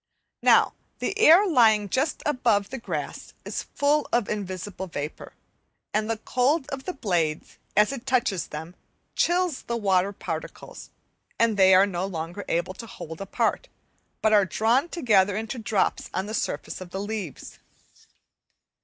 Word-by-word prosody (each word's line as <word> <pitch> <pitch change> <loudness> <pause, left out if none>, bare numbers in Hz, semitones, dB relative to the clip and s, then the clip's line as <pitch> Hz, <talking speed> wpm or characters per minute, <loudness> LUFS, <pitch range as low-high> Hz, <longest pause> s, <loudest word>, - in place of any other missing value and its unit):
Now - - +5 0.2
the - - -2
air 370 0 +7
lying 225 - +4
just 270 - -1
above 235 -7 +1
the 265 - -5
grass - - -5
is - - -3
full 290 +1 +2
of 240 -3 +1
invisible 190 -1 -5
vapour, 150 -2 -6 0.6
and 215 +1 0
the 225 - 0
cold 265 +6 +1
of 270 -1 -5
the 365 - -3
blades, 170 - -2 0.2
as 210 +3 +5
it 265 -2 -7
touches 240 -9 +1
them, 160 +3 -7 0.4
chills 350 -4 +1
the 235 - -3
water 195 -3 +2
particles, 165 -5 -7 0.5
and 230 -2 +3
they 190 -1 +6
are 190 +2 +7
no 190 -1 -3
longer 175 +2 -5
able 170 +2 -1
to 230 +4 -9
hold 160 -4 -9
apart, 195 - -1 0.6
but 220 0 +4
are 205 -1 +6
drawn 230 - +1
together 205 - +2
into 225 +3 -4
drops 215 -2 0
on 190 +1 -1
the 215 - -6
surface 220 - -3
of 185 - -8
the 190 - -5
leaves. 205 - -6
210 Hz, 155 wpm, -25 LUFS, 190-255 Hz, 0.6 s, air